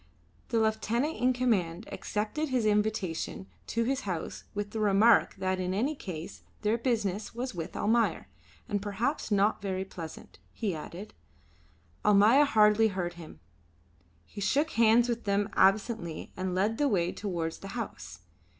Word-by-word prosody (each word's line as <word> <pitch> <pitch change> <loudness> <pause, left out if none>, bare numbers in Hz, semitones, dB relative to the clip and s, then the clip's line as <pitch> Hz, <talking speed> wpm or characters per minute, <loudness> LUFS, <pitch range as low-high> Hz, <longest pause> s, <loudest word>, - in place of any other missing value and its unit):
The 230 - +2
lieutenant 220 +6 0
in 250 +1 +3
command 215 -7 0
accepted 220 +9 -2
his 250 -4 +1
invitation 210 - 0 0.2
to 230 - 0
his 265 +3 0
house 180 -5 -5
with 205 0 -3
the 220 - -4
remark 215 +2 +4
that 185 0 -1
in 185 0 -1
any 260 +9 +1
case 175 - -7 0.2
their 210 +2 +2
business 220 -4 -1
was 250 +2 -3
with 165 -3 -6
Almayer 230 +2 +1 0.4
and 205 -1 -1
perhaps 215 +9 -2
not 205 0 +2
very 190 -1 -2
pleasant, 165 -4 -9
he 210 -5 -2
added. 170 +6 -8 0.9
Almayer 210 +8 +6
hardly 215 -3 +5
heard 185 -4 -3
him. 160 - -12 0.8
He 205 - -9
shook 290 +10 +1
hands 230 +1 +4
with 235 -1 -3
them 200 0 +1
absently 195 -3 +1
and 185 0 -3
led 210 +4 0
the 290 - +3
way 180 -7 +1
towards 170 -5 -4
the 195 - -8
house. 85 - -6
210 Hz, 150 wpm, -29 LUFS, 185-230 Hz, 0.9 s, Almayer